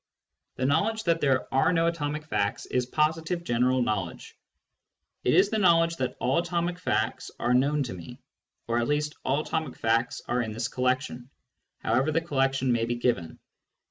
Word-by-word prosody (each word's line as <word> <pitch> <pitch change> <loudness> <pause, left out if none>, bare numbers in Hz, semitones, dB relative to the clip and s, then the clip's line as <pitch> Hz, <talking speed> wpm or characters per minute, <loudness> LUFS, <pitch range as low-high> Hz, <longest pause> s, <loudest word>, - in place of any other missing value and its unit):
The 130 - -1
knowledge 210 +11 +1
that 165 -3 +1
there 135 -2 +2
are 135 - +4
no 165 -2 +2
other 170 - +3
atomic 150 -1 -3
facts 105 -8 -1
is 125 -1 -1
positive 160 +4 0
general 125 -2 +2
knowledge; 100 -7 -3 0.9
it 125 - +3
is 195 +3 +4
the 220 - +1
knowledge 165 -3 +4
that 130 -1 -2
" - - -35
all 130 +5 +2
atomic 175 +1 -2
facts 110 -10 -1
are 120 - +1
known 140 +3 +2
to 125 - -5
me," 85 -2 -10 0.5
or 115 +1 +1
at 120 - 0
least 150 0 0
"all 140 +3 +1
atomic 155 -4 -3
facts 115 +2 +1
are 125 +1 +1
in 110 -2 -4
this 115 +1 -2
collection 125 -1 -1 0.2
" 125 - -54
— - - -56
however 130 +7 +2
the 160 - +2
collection 135 -5 0
may 115 -1 +1
be 120 +1 -1
given. 120 -9 -1
135 Hz, 190 wpm, -27 LUFS, 120-165 Hz, 0.9 s, are